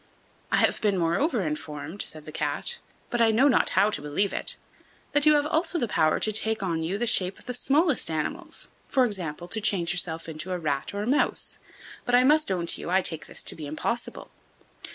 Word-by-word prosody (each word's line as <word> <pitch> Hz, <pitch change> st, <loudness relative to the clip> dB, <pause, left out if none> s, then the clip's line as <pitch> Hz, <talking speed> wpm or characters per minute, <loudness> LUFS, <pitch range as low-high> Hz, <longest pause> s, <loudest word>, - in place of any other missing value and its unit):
"I -, -, +4 dB
have -, -, +2 dB
been, 205 Hz, -3 st, +2 dB
moreover, 190 Hz, -, +1 dB
informed," 155 Hz, +2 st, -5 dB
said 155 Hz, -1 st, -4 dB
the 155 Hz, -, -8 dB
Cat, 475 Hz, -, -2 dB, 0.3 s
"but 240 Hz, -2 st, +1 dB
I 230 Hz, -, +5 dB
know 235 Hz, +6 st, +4 dB
not 260 Hz, -, +3 dB
how 210 Hz, -, +5 dB
to 145 Hz, -, -2 dB
believe 150 Hz, +7 st, 0 dB
it, -, -, 0 dB, 0.6 s
that 290 Hz, +1 st, +2 dB
you 305 Hz, -, +8 dB
have 290 Hz, 0 st, +2 dB
also 325 Hz, +3 st, 0 dB
the 240 Hz, -, 0 dB
power 155 Hz, -6 st, +2 dB
to 215 Hz, -, +2 dB
take 220 Hz, 0 st, 0 dB
on 165 Hz, -4 st, -1 dB
you 170 Hz, +5 st, -2 dB
the 240 Hz, -, -1 dB
shape 190 Hz, -4 st, +1 dB
of -, -, -17 dB
the 250 Hz, -, -4 dB
smallest 280 Hz, -, +2 dB
animals; 155 Hz, -2 st, -3 dB, 0.2 s
for 260 Hz, -2 st, +3 dB
example, 175 Hz, -6 st, -3 dB
to 220 Hz, -, -2 dB
change 180 Hz, -5 st, +1 dB
yourself 165 Hz, -2 st, -1 dB
into 160 Hz, +3 st, -4 dB
a -, -, -1 dB
rat 150 Hz, +1 st, -2 dB
or 205 Hz, -, -2 dB
a -, -, -4 dB
mouse; 280 Hz, +4 st, +1 dB, 0.4 s
but 245 Hz, -, +2 dB
I 250 Hz, -, +6 dB
must 305 Hz, -1 st, +4 dB
own 175 Hz, -2 st, -1 dB
to -, -, -1 dB
you -, -, -5 dB
I 190 Hz, +2 st, +3 dB
take 160 Hz, -4 st, -4 dB
this -, -, -6 dB
to -, -, +1 dB
be 155 Hz, -2 st, -7 dB
impossible." 235 Hz, +11 st, -4 dB
200 Hz, 220 wpm, -26 LUFS, 165-245 Hz, 0.6 s, you